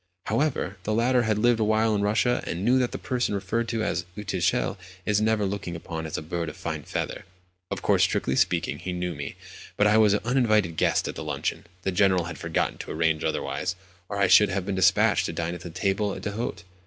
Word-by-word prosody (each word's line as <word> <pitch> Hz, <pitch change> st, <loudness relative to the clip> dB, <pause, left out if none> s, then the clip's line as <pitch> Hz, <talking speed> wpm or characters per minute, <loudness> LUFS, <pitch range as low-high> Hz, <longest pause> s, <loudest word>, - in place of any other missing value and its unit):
However, 120 Hz, -4 st, 0 dB
the 105 Hz, +2 st, -1 dB
latter 125 Hz, +2 st, +3 dB
had 105 Hz, -, +2 dB
lived 120 Hz, +1 st, +3 dB
awhile 110 Hz, +1 st, +2 dB
in 105 Hz, -, +1 dB
Russia, 110 Hz, +4 st, +1 dB
and 90 Hz, +4 st, -3 dB
knew 125 Hz, +2 st, +4 dB
that 125 Hz, -1 st, 0 dB
the -, -, -4 dB
person 125 Hz, -4 st, -1 dB
referred 105 Hz, +4 st, -1 dB
to 115 Hz, -1 st, -1 dB
as 90 Hz, -, -1 dB
an 105 Hz, -, -6 dB
"uchitel" 95 Hz, +4 st, 0 dB, 0.3 s
is 105 Hz, 0 st, +2 dB
never 110 Hz, -1 st, +2 dB
looked 100 Hz, 0 st, -3 dB
upon 80 Hz, -1 st, -5 dB
as 75 Hz, -, -4 dB
a -, -, -5 dB
bird 85 Hz, +1 st, -3 dB
of 75 Hz, -, -10 dB
fine -, -, -4 dB
feather. -, -, -4 dB, 0.5 s
Of -, -, -4 dB
course, -, -, +3 dB
strictly 65 Hz, -, +1 dB
speaking, -, -, +1 dB
he 90 Hz, -, -4 dB
knew 90 Hz, 0 st, -2 dB
me; 70 Hz, -2 st, -6 dB, 0.4 s
but 105 Hz, -, +4 dB
I 105 Hz, +1 st, +5 dB
was 105 Hz, -2 st, +5 dB
an -, -, -1 dB
uninvited 110 Hz, -9 st, +2 dB
guest -, -, +1 dB
at -, -, -3 dB
the -, -, -6 dB
luncheon—the 90 Hz, +2 st, -4 dB
General 95 Hz, -1 st, +3 dB
had 90 Hz, +2 st, -7 dB
forgotten 80 Hz, -1 st, -1 dB
to -, -, -7 dB
arrange 80 Hz, 0 st, +1 dB
otherwise, 95 Hz, -, -2 dB, 0.3 s
or 100 Hz, -, -3 dB
I 100 Hz, -, +4 dB
should 95 Hz, +3 st, +6 dB
have 95 Hz, -1 st, -2 dB
been 100 Hz, -, -2 dB
dispatched 95 Hz, 0 st, +3 dB
to -, -, -4 dB
dine 85 Hz, 0 st, -2 dB
at 90 Hz, -, -7 dB
the 85 Hz, -, -7 dB
table 100 Hz, +3 st, -1 dB
d'hôte. 105 Hz, -4 st, -4 dB
100 Hz, 220 wpm, -26 LUFS, 90-110 Hz, 0.5 s, should